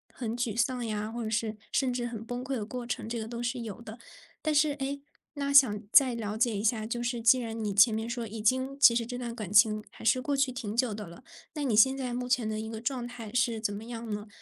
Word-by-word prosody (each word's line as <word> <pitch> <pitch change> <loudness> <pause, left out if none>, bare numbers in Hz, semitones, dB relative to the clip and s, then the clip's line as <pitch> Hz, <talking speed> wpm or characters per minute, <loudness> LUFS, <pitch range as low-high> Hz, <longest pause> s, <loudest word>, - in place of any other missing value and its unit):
很 235 -1 -4
沮 235 -3 -2
丧 245 0 0
呀， 215 0 -3
或 235 0 -4
者 220 - -3
是 220 -1 -1
甚 265 -2 +1
至 245 -1 -2
很 225 -2 -5
崩 245 +2 -5
溃 265 0 -3
的 220 - -3
过 245 +2 -6
程， 235 -2 -4
这 235 - -3
个 220 - -5
都 235 +1 -6
是 240 0 -2
有 225 0 -7
的。 225 0 -9 0.5
但 310 - +1
是， 300 0 +3
诶， 280 0 -4 0.3
那 280 -1 -2
想 250 -7 +6
再 260 -1 +6
了 215 -2 -4
解 230 -2 +2
一 200 - -3
下， 220 -1 +1
就 240 +2 -3
是 240 0 -2
既 230 +3 +5
然 225 -2 -5
你 205 - -1
前 205 +3 +6
面 220 +1 -2
说 235 -1 -4
已 220 +1 -7
经 260 +5 0
其 235 -5 +7
实 230 -1 0
这 245 0 -5
段 235 -2 -5
感 215 -6 -6
情 215 0 +5
还 - - -13
是 255 +3 +3
过 280 +1 -1
去 270 -1 +2
挺 225 -4 -5
久 240 -3 +2
的 210 -2 -7
了， 170 +1 -13 0.3
那 295 - -2
你 250 -6 +1
现 265 +5 +5
在 255 -2 -3
目 250 0 -3
前 245 -4 +1
的 215 0 -2
一 220 0 -5
个 225 -1 -6
状 245 +1 -3
态 235 -3 -9
是 240 -2 +1
怎 210 -2 -2
么 210 +2 -7
样 235 -1 -7
呢？ 210 +1 -5
235 Hz, 295 characters per minute, -29 LUFS, 220-250 Hz, 0.5 s, 其